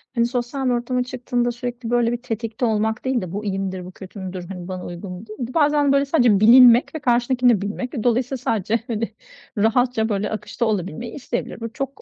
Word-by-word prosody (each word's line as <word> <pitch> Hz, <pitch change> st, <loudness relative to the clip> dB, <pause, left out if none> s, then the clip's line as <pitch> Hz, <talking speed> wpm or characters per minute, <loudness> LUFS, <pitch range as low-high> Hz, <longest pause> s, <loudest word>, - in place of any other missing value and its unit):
hani, 235 Hz, -1 st, +3 dB
sosyal 245 Hz, +2 st, -2 dB
bir -, -, +2 dB
ortama 245 Hz, +1 st, 0 dB
çıktığında 245 Hz, -1 st, -1 dB
sürekli, 240 Hz, -1 st, -5 dB
böyle, 240 Hz, -1 st, +2 dB
bir 240 Hz, 0 st, -3 dB
tetikte 230 Hz, 0 st, -3 dB
olmak 220 Hz, +1 st, 0 dB
değil 260 Hz, -2 st, +1 dB
de 180 Hz, -2 st, -6 dB
bu 205 Hz, +2 st, -4 dB
iyi 195 Hz, -1 st, -1 dB
midir, 190 Hz, -2 st, -4 dB
bu 180 Hz, -, -9 dB
kötü 190 Hz, +2 st, -11 dB
müdür, 185 Hz, -2 st, -6 dB
hani, 180 Hz, -2 st, -7 dB
bana 185 Hz, -1 st, -5 dB
uygun 175 Hz, +2 st, -7 dB
mudur? 210 Hz, +4 st, -9 dB
Bir 245 Hz, -, -2 dB
de 250 Hz, -, -10 dB
bazen, 295 Hz, -2 st, +3 dB
böyle, 280 Hz, 0 st, +3 dB
sadece 245 Hz, -9 st, +3 dB
bilinmek 240 Hz, +5 st, +7 dB
ve -, -, -2 dB
karşındakini 245 Hz, -1 st, +3 dB
de 205 Hz, -, -1 dB
bilmek 210 Hz, +6 st, -4 dB
ve 230 Hz, -, -3 dB
dolayısıyla 250 Hz, +2 st, +1 dB
sadece 225 Hz, -2 st, 0 dB
hani 230 Hz, -1 st, -3 dB, 0.4 s
rahatça, 225 Hz, +1 st, +2 dB
böyle, 205 Hz, -1 st, -1 dB
akışta 215 Hz, +2 st, -3 dB
olabilmeyi 210 Hz, +1 st, -3 dB
isteyebilir. 245 Hz, -5 st, -4 dB
Bu 230 Hz, 0 st, -6 dB
çok 275 Hz, -1 st, -5 dB
235 Hz, 215 wpm, -22 LUFS, 210-250 Hz, 0.4 s, bilinmek